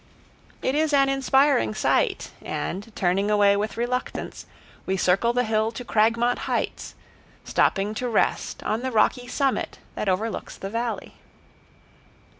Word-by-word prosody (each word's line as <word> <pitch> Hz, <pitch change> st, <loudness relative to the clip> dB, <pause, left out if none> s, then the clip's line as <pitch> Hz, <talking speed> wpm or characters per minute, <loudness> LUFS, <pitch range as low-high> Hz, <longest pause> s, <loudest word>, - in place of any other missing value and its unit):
It 260 Hz, -, +1 dB
is 305 Hz, +1 st, +1 dB
an 275 Hz, -1 st, +4 dB
inspiring 270 Hz, -, +3 dB
sight, -, -, +1 dB
and, 200 Hz, +5 st, -4 dB
turning 195 Hz, +3 st, +1 dB
away 205 Hz, -1 st, +4 dB
with 210 Hz, +2 st, -2 dB
reluctance, 250 Hz, +2 st, -3 dB, 0.4 s
we 190 Hz, -, 0 dB
circle 190 Hz, +6 st, +3 dB
the 245 Hz, +1 st, +1 dB
hill 220 Hz, -1 st, +1 dB
to 245 Hz, +2 st, -7 dB
Cragmont 230 Hz, +3 st, +2 dB
Heights, -, -, -2 dB, 0.5 s
stopping 200 Hz, +2 st, +1 dB
to 245 Hz, +3 st, -3 dB
rest 225 Hz, -, 0 dB
on 220 Hz, +2 st, -1 dB
the 260 Hz, 0 st, -2 dB
rocky 245 Hz, +2 st, +2 dB
summit 275 Hz, +1 st, -1 dB, 0.2 s
that 205 Hz, -, -2 dB
overlooks 210 Hz, +4 st, -2 dB
the 195 Hz, -, -6 dB
valley. 230 Hz, +1 st, -3 dB
225 Hz, 135 wpm, -25 LUFS, 205-250 Hz, 0.5 s, an